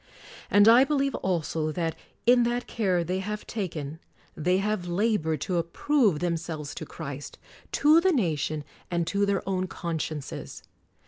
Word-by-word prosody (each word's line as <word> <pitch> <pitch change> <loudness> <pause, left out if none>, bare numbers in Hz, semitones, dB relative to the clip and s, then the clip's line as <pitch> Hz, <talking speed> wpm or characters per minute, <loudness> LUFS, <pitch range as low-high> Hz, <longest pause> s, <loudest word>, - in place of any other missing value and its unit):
And 205 +1 +6
I 235 +3 +8
believe 275 -1 +1
also 165 -3 -1
that, 165 -2 -1 0.3
in 245 +1 +6
that 240 +1 0
care 185 -6 0
they 180 +3 -2
have 210 +2 -4
taken, 160 -8 -4 0.4
they 180 +4 +2
have 200 -2 -1
labored 175 - 0
to 180 - -1
approve 195 - +2
themselves 165 -3 -3
to 155 - -7
Christ, 145 -3 -7 0.4
to 310 +3 +5
the 380 +1 +4
nation 155 - 0 0.3
and 170 -1 0
to 200 +4 +1
their 200 -2 0
own 185 -1 0
con 170 -2 -4
sciences. 150 -2 -5
180 Hz, 150 wpm, -27 LUFS, 160-215 Hz, 0.4 s, I